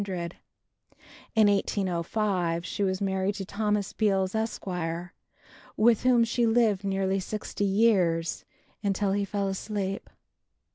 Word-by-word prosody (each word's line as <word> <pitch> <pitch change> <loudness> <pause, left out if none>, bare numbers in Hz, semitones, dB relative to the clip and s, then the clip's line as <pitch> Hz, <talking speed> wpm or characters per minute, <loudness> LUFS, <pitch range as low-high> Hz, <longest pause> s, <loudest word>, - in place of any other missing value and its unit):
In 220 -1 +6
1805 185 -2 0
she 190 - -4
was 190 -1 0
married 190 0 0
to 195 - -5
Thomas 210 0 -1
Beals, 195 -3 +1
Esq., 220 0 -2 1.1
with 225 0 +4
whom 250 -2 +4
she 235 +1 +1
lived 225 -4 +3
nearly 195 0 0
sixty 205 +1 -3
years, 190 -5 +2 0.4
until 200 -1 0
he 200 +1 0
fell 200 0 -2
asleep. 195 0 -3
200 Hz, 110 wpm, -27 LUFS, 190-215 Hz, 1.1 s, In